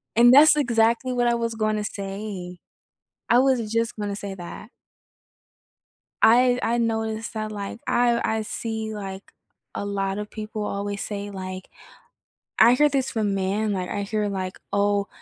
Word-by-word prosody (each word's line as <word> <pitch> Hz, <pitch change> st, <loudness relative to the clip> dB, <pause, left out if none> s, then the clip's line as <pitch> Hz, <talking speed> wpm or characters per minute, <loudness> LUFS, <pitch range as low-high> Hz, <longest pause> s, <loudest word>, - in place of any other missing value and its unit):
And 240 Hz, +1 st, +7 dB
that's 300 Hz, +3 st, +8 dB
exactly 235 Hz, -2 st, +2 dB
what 245 Hz, -1 st, +1 dB
I 235 Hz, -, +3 dB
was 230 Hz, -1 st, -2 dB
gonna 215 Hz, -1 st, 0 dB
say. 195 Hz, -3 st, -6 dB, 0.7 s
I 240 Hz, -, +5 dB
was 250 Hz, -5 st, +2 dB
just 230 Hz, 0 st, 0 dB
gonna 205 Hz, -1 st, -3 dB
say 200 Hz, -1 st, -6 dB
that. 180 Hz, +3 st, -9 dB, 1.5 s
I 245 Hz, +2 st, +5 dB
I 235 Hz, +1 st, +1 dB
noticed 220 Hz, -1 st, -2 dB
that, 215 Hz, -1 st, -4 dB
like 205 Hz, +2 st, -6 dB
I 240 Hz, -1 st, +3 dB
I 220 Hz, 0 st, 0 dB
see, 220 Hz, 0 st, -4 dB
like, 195 Hz, -1 st, -6 dB, 0.5 s
a -, -, -3 dB
lotta 200 Hz, 0 st, -2 dB
people 215 Hz, 0 st, -6 dB
always 200 Hz, 0 st, -3 dB
say, 205 Hz, -1 st, -5 dB
like 185 Hz, -1 st, -7 dB, 0.9 s
I 235 Hz, +2 st, +7 dB
hear 295 Hz, +3 st, +4 dB
this 270 Hz, -2 st, -1 dB
from 210 Hz, -4 st, 0 dB
men, 200 Hz, +2 st, 0 dB
like, 185 Hz, -1 st, -3 dB
I 205 Hz, -, -2 dB
hear, 210 Hz, +1 st, -1 dB
like, 185 Hz, -1 st, -4 dB
"Oh, 200 Hz, 0 st, +1 dB
215 Hz, 155 wpm, -24 LUFS, 200-230 Hz, 1.5 s, that's